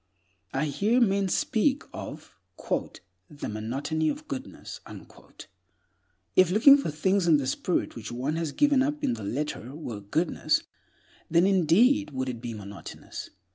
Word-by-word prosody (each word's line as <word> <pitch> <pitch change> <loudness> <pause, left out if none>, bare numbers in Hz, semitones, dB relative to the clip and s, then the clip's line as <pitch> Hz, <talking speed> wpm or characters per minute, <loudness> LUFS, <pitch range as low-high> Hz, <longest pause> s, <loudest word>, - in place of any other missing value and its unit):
I 135 +3 0
hear 205 - +1
men 200 -4 +2
speak 265 +8 +1
of - - -8 0.9
the 150 -2 -6
"monotony 135 +9 -2
of 300 +1 -5
goodness." 275 -1 -7 1.6
If 185 -2 +6
looking 220 +9 +8
for 280 - -1
things 180 +5 +1
in 160 -3 +6
the 140 - -2
spirit 150 +6 -1
which 110 -1 -7
one 130 +6 -2
has 165 -2 -2
given 285 - +3
up 295 +2 -1
in - - +2
the 110 -2 -6
letter 130 +2 -4
were 120 -10 -6
"goodness," 155 - 0 0.7
then 170 +2 +4
indeed 190 - +4
would 130 -2 -3
it 120 -2 -6
be 120 -2 -5
monotonous. 100 -1 -9
160 Hz, 140 wpm, -27 LUFS, 130-205 Hz, 1.6 s, looking